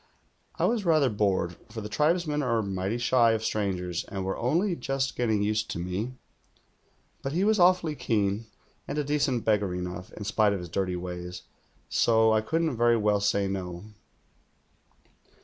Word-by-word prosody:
I - - +1
was 230 -3 +1
rather 155 -7 +3
bored, 95 -5 0
for 110 0 -6
the 105 - -5
tribesmen 150 +5 +1
are 115 -4 +1
mighty 95 +3 -2
shy 120 -1 +4
of 110 0 -2
strangers 90 -5 -1
and 95 -2 -5
wei'e 95 - -1
only 170 - +1
just 135 -3 -2
getting 110 -4 +1
used 110 +1 0
to - - -4
me; 95 +8 -3 1.1
but 135 - -3
he 180 +4 +1
was 215 0 +3
awfully 180 -3 +4
keen, 105 -4 -1 0.4
and 145 - -4
a 150 - +1
decent 140 -4 0
beggar 105 -4 +1
enough, 90 0 -5
in 105 - -7
spite 105 0 +2
of 100 - -2
his 90 -1 -7
dirty 90 +1 -1
ways, 90 0 -6 0.4
so 110 -1 +3
I 110 - +3
couldn't 160 +2 -1
very 120 0 +4
well 105 -1 +2
say 100 -1 +1
'No." 95 +1 -5
110 Hz, 165 wpm, -27 LUFS, 95-135 Hz, 1.1 s, shy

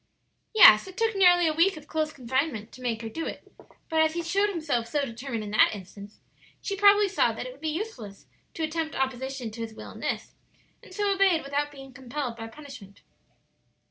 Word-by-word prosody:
"Yes; 215 - +8
it 375 0 -12
took 455 -1 +1
nearly 355 -2 +5
a 315 - +2
week 335 +3 +3
of 300 - -11
close 310 -1 -1
confinement 260 -3 -2
to 255 - -13
make 235 -2 -2
her - - -4
do 325 +9 -5
it; - - -9 0.4
but 320 -1 +2
as 315 0 +2
he 340 - -2
showed 395 +5 +1
himself 300 - -2
so 290 +2 -1
determined 235 -2 -5
in 205 - -7
that 215 - +4
instance, 200 +1 -12 0.4
she 395 - -4
probably 405 +1 +5
saw 240 - +2
that 225 - -6
it 255 - -6
would 270 +3 -17
be 320 - -2
useless 305 - -6 0.3
to 325 - -3
attempt 315 0 -3
opposition 265 -2 -3
to 230 +2 -8
his 225 -1 -6
will - - -9
in - - -12
this, - - -4 0.5
and - - -16
so 405 +1 0
obeyed 380 -4 +3
without 290 +1 -2
being 270 -2 -12
compelled 260 -1 -5
by 225 0 -7
punishment." 240 -6 -12
285 Hz, 205 wpm, -27 LUFS, 235-335 Hz, 0.5 s, Yes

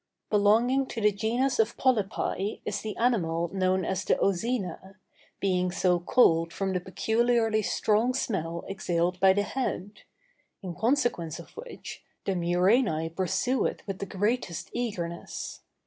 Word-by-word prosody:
Belonging 230 +6 +3
to 235 - -5
the 210 0 +5
genus 240 +6 0
of 220 +1 +2
polypi 210 -4 0
is 210 -1 -2
the 215 -2 -5
animal 170 -9 +1
known 185 -1 +1
as 190 +1 -1
the - - +2
ozæna, 195 -2 -1 0.4
being 180 -2 +1
so 180 -1 +2
called 165 -4 +3
from 195 -1 -2
the 180 - +1
peculiarly 225 +4 +1
strong 220 +4 +1
smell 170 -9 -2
exhaled 180 -2 -1
by 190 0 +6
the 205 +2 +2
head; 210 -4 -3 0.6
in 180 -2 -4
consequence 230 - 0
of 170 - -11
which, 475 +2 -9 0.2
the - - +1
murænæ 175 -1 +2
pursue 240 +8 +1
it - - -6
with 195 -2 -5
the 200 - -4
greatest 205 -2 -2
eagerness. 175 -8 -4
200 Hz, 140 wpm, -28 LUFS, 180-230 Hz, 0.6 s, by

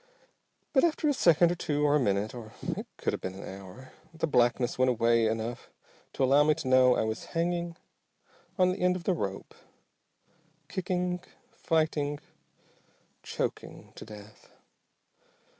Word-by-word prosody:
But 265 - +4
after 325 -2 +2
a 290 - +3
second 170 - +4
or - - -1
two, 150 -3 -1
or 145 0 +4
a - - +4
minute, 105 -1 0
or 115 -3 -9
it - - -4
could - - -1
have - - -4
been 95 0 -5
an 95 - -8
hour, 100 +7 -11 0.2
the 165 0 -2
blackness 120 -3 +2
went 130 0 +4
away 115 -1 +3
enough 115 +2 -3 0.4
to - - -1
allow 140 +3 +5
me 155 0 +3
to 145 - -6
know 130 -1 +5
I - - +1
was 110 0 -3
hanging 170 0 -1 0.8
on 185 -1 +4
the 185 - -4
end 180 0 +2
of 180 - -5
the 190 - +1
rope, 100 - -4 1.1
kicking, 180 -1 -2 0.3
fighting, 155 -7 0 1.0
choking - - -5
to - - -10
death. 105 0 -13
145 Hz, 155 wpm, -29 LUFS, 115-175 Hz, 1.1 s, allow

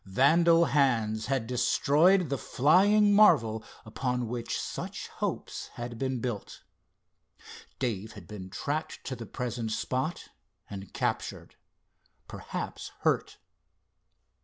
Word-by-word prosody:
Vandal 165 - +4
hands 115 -8 +1
had 130 -3 0
destroyed 145 +8 +3
the 140 - -1
flying 205 +9 +4
marvel 115 - +5 0.2
upon 125 +2 -2
which 120 0 -3
such - - -5
hopes - - -3
had 120 -1 -6
been 130 -2 -1
built. 115 -4 -5 1.1
Dave 110 -5 -3
had 100 -5 -11
been 95 -2 -8
tracked 150 +10 -4
to 130 - -4
the 115 -2 -8
present 120 -3 -4
spot 130 +8 -2 0.4
and 100 -1 -8
captured; - - -3 0.7
perhaps - - -6
hurt. - - 0
125 Hz, 110 wpm, -29 LUFS, 110-150 Hz, 1.1 s, marvel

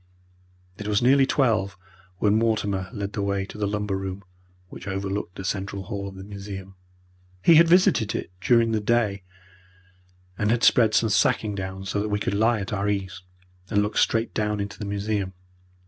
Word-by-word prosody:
It 105 - -5
was 105 +1 +1
nearly 135 +2 +5
twelve 105 - +1 0.4
when 100 +2 +2
Mortimer 105 -4 0
led 100 -1 -5
the 105 - -2
way 100 -1 -1
to - - -12
the 105 -1 -1
lumber 105 -1 -2
room 95 0 -5 0.5
which - - -10
overlooked 95 -1 -3
the 95 - -7
central 95 0 -3
hall 100 0 -5
of 95 - -9
the 95 - -9
museum. 100 -1 -8 0.7
He 170 - +7
had 165 +1 +7
visited 170 - +4
it - - -4
during 115 -2 +3
the 110 -1 0
day, 105 -3 +1 1.2
and 105 - +1
had 120 +1 +1
spread 110 -3 +5
some 115 +2 +3
sacking 105 0 +2 0.3
so 100 +1 -1
that 105 - -2
we 105 - 0
could 100 - -2
lie 110 +2 +2
at 100 +1 -5
our 100 0 0
ease, 100 -2 -3 0.5
and 105 -2 +2
look 105 +1 -3
straight 115 0 +1
down 105 -1 -1
into 100 -2 -5
the 105 - -4
museum. 100 -1 -2
105 Hz, 180 wpm, -25 LUFS, 100-110 Hz, 1.2 s, He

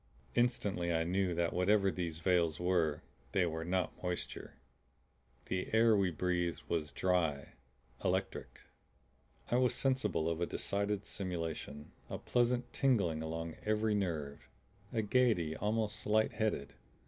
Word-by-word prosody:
Instantly 100 -8 +1
I 80 -1 +2
knew 90 +1 0
that 85 0 0
whatever 95 +2 +3
these 85 -4 -3
veils 85 -4 +2
were, 85 -4 +1 0.3
they 95 - +3
were 80 -1 -3
not 90 +2 -1
moisture. 90 -1 -4 0.9
The 90 0 -3
air 115 0 +6
we 100 -2 +3
breathed 90 0 -1
was 80 -3 -1
dry, 80 -4 0 0.5
electric. 95 +1 -2 0.9
I 120 - +4
was 125 -1 +3
sensible 120 - +1
of 85 0 -1
a 85 - +1
decided 100 0 -1
stimulation, 80 -6 -4 0.2
a - - -3
pleasant 120 0 0
tingling 100 -13 +2
along 80 0 -4
every 110 0 +1
nerve, 80 -8 -2 0.4
a 115 -3 0
gaiety 105 -9 +2
almost 105 +1 -1
light 110 +1 +3
headed. 105 -11 -1
90 Hz, 130 wpm, -34 LUFS, 80-105 Hz, 0.9 s, air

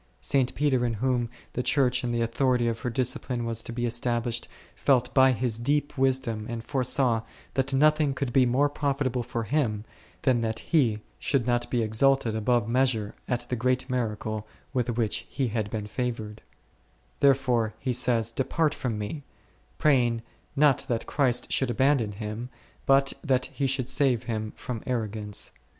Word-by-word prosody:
St. 130 -2 +1
Peter 135 -4 +2
in 120 -2 0
whom 120 +1 0 0.2
the 125 - -1
Church 125 -2 +2
and 120 - -1
the 120 0 0
authority 125 +1 +1
of 115 -1 -1
her 125 - -2
discipline 125 -1 -1
was 115 -1 -1
to - - -7
be 120 +1 -2
established, 120 0 -1 0.3
felt 125 -3 +2
by 130 -1 +6
his 120 -2 0
deep 145 +4 0
wisdom 130 -5 0
and 115 -1 -4
foresaw, 130 -3 +2 0.3
that 135 0 0
nothing 150 0 +3
could 135 -3 -3
be 130 -2 +5
more 135 +4 +3
profitable 140 -3 -1
for 120 -1 -3
him 110 -4 -1 0.4
than 125 -4 +3
that 110 -1 -1
he 120 -10 +1 0.2
should 135 -5 +1
not 120 -1 0
be 120 -2 +1
exalted 115 +1 +2
above 115 0 +1
measure 115 -4 +1
at 125 -1 0
the 125 - 0
great 130 +2 0
miracle 110 -3 -2 0.3
with 120 -2 -1
which 110 -3 -1
he 130 -3 -1
had 110 -2 -2
been 105 -1 -4
favoured; 110 -2 -4 0.8
therefore 125 -5 +2
he 130 -2 -2
says, 120 -2 +2
Depart 145 +5 0
from 125 -8 -3
me, 105 +9 -4 0.6
praying, 120 -6 +2 0.3
not 145 -2 +4
that 115 -2 -1
Christ 130 -4 0
should 135 - +1
abandon 120 -3 +2
him, 110 +4 -5 0.4
but 135 0 +4
that 130 -4 +1
He 140 - 0
should 130 -2 -1
save 130 -3 +2
him 110 -2 -3
from 120 -3 -5
arrogance. 110 -4 -3
125 Hz, 165 wpm, -27 LUFS, 115-135 Hz, 0.8 s, by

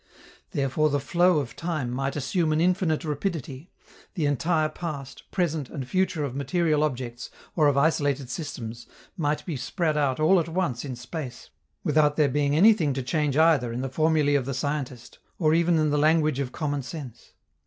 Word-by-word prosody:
Therefore 140 +2 +1
the 145 0 +1
flow 175 +4 +3
of 135 -4 -3
time 155 -8 -3
might 135 +2 -2
assume 155 +3 0
an 155 - +2
infinite 175 -2 +1
rapidity, 150 -1 -4 0.5
the 165 -5 0
entire 155 +3 +1
past, 150 -5 -7
present, 160 -7 -1
and 135 -4 -6
future 185 -1 0
of 135 -3 -4
material 155 +2 +1
objects 125 -4 -3 0.3
or 155 -3 +4
of 140 -1 +2
isolated 145 -3 +1
systems 120 -5 -6 0.3
might 150 -4 -1
be 170 - -3
spread 155 +4 -1
out 140 -2 +1
all 175 +5 +5
at 165 0 -2
once 160 -9 -1
in 135 -3 -5
space, 125 +1 -7 0.3
without 150 -1 +3
there 150 -3 +3
being 145 +1 +1
anything 175 -5 +5
to 135 0 -3
change 150 +1 0
either 155 -7 +4
in 120 +2 -3
the 135 - -3
formulae 155 0 +2
of 140 -3 +2
the 135 - -2
scientist 135 -3 -4 0.2
or 155 -3 +3
even 170 0 +3
in 155 -1 +2
the 145 - +2
language 155 -2 +3
of 130 -3 -2
common 145 -1 -2
sense. 130 -2 -9
150 Hz, 180 wpm, -26 LUFS, 135-160 Hz, 0.5 s, all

